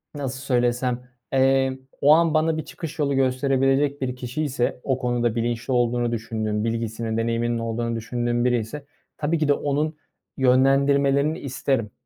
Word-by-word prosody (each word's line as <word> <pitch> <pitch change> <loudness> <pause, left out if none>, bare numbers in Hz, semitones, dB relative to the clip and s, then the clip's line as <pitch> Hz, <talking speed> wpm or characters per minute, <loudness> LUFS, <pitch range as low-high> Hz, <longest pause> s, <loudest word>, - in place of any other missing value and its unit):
nasıl 135 -3 -4
söylesem, 125 -1 0 0.2
eee, 135 0 +3 0.2
o 145 +2 +7
an 165 0 +4
bana 160 +1 +2
bir 155 - -4
çıkış 165 -1 -8
yolu 140 -1 +1
gösterebilecek 135 +2 +1
bir 125 -1 -2
kişiyse, 125 0 -2
o 130 -2 0
konuda 120 -2 0
bilinçli 120 +2 -1
olduğunu 120 -1 +1
düşündüğüm, 110 -2 -2
bilgisinin, 115 0 -2
deneyiminin 115 +1 0
olduğunu 115 0 -2
düşündüğüm 120 +1 -1
biriyse 125 +4 -1 0.3
tabii 155 +2 0
ki 155 -1 0
de 145 - +5
onun 150 +2 -1 0.4
yönlendirmelerini 140 +3 +3
isterim. 130 - -2
130 Hz, 140 wpm, -23 LUFS, 120-140 Hz, 0.4 s, o